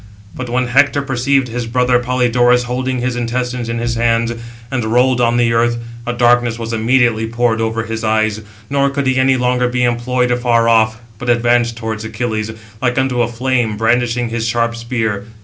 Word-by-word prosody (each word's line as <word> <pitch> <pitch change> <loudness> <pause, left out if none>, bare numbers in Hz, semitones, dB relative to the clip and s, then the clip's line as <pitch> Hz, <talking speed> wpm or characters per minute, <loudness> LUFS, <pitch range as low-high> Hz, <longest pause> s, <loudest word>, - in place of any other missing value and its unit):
But 130 -1 -6
when 125 +1 0
Hector 140 +3 +2
perceived 135 0 +1
his 120 0 -4
brother 125 +1 +2
Polydorus 125 0 +2
holding 125 +1 -2
his 125 0 -1
intestines 120 0 -3
in 115 - -2
his 120 0 -1
hands, 115 0 +1 0.4
and 130 -3 -1
rolled 125 +3 +2
on 120 0 +2
the 120 -1 +2
earth, 120 +1 +2 0.3
a - - 0
darkness 120 -1 +2
was 115 0 -5
immediately 115 -1 +2
poured 115 -1 0
over 115 0 -1
his 115 0 -5
eyes, 110 -1 0 0.3
nor 140 +1 +1
could 140 0 -2
he 130 0 +1
any 130 0 +3
longer 125 0 +1
be 125 0 0
employed 125 +1 0
afar 120 -1 +2
off, 110 -1 +3 0.2
but 125 - -4
advanced 120 0 +2
towards 110 -1 -4
Achilles, 110 -1 -3 0.3
like 125 -1 0
unto 130 -2 +1
a 120 - +1
flame, 120 -2 -1
brandishing 120 +1 +1
his 115 0 -2
sharp 115 0 0
spear. 115 -4 -3
120 Hz, 185 wpm, -16 LUFS, 115-125 Hz, 0.4 s, any